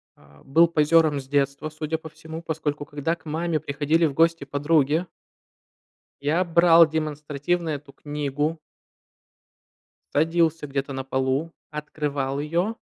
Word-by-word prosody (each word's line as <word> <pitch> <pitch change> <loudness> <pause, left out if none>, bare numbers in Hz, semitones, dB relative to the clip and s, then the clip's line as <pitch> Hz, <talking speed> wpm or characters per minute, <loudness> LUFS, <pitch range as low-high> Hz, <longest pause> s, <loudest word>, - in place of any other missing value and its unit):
э, 70 0 -21
был 165 +5 +5
позером 155 -2 +3
с 130 - -10
детства, 140 +2 0
судя 155 +1 -3
по 160 0 -10
всему, 160 +1 -9
поскольку, 150 -3 -3
когда 145 +3 -2
к 160 - -29
маме 160 +1 -1
приходили 150 +3 +1
в 150 - 0
гости 165 -1 +2
подруги 145 +3 +2 1.2
я 155 +6 +1
брал 170 -1 +6
демонстративно 155 +2 -2
эту 145 -2 -5
книгу 145 +2 -3 1.6
садился 165 0 +2
где-то 140 0 -3
на 135 0 -4
полу, 130 +4 -1 0.2
открывал 145 -2 -3
ее 170 +9 -1
150 Hz, 125 wpm, -24 LUFS, 140-165 Hz, 1.6 s, брал